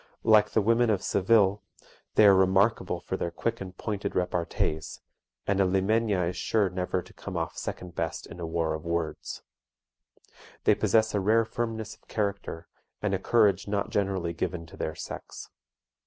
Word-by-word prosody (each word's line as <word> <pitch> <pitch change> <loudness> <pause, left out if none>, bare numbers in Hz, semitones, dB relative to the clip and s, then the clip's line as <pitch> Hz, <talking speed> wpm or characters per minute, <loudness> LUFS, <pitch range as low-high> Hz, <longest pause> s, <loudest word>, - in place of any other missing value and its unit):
Like 110 -2 +5
the 110 - +1
women 115 +2 +3
of 100 -3 +1
Seville, 100 0 +3 0.5
they 110 - +7
are 100 - +8
remarkable 95 -1 +2
for 95 - -3
their 85 - -2
quick 115 +6 -3
and 95 -1 -8
pointed 105 -2 -3
repartees, 85 -3 -1 0.5
and 100 0 +2
a - - +6
Limeña 95 0 +2
is 90 - -3
sure 105 -5 +1
never 90 0 -2
to 90 - -17
come 95 -3 -6
off 80 -1 -3
second 90 -1 -6
best 80 -2 -3
in 85 - -11
a 85 - -4
war 80 -1 0
of 80 0 -5
words. 85 -2 -3 1.2
They - - +5
possess 110 -1 +2
a 105 - +2
rare 110 +4 +3
firmness 110 -1 -3
of - - -22
character, 100 -5 -3 0.3
and 105 -2 -1
a 95 - +1
courage 100 -3 +3
not 100 -1 -1
generally 95 -4 0
given 85 0 -3
to 80 - -13
their 80 - -3
sex. - - -8
95 Hz, 170 wpm, -28 LUFS, 85-105 Hz, 1.2 s, are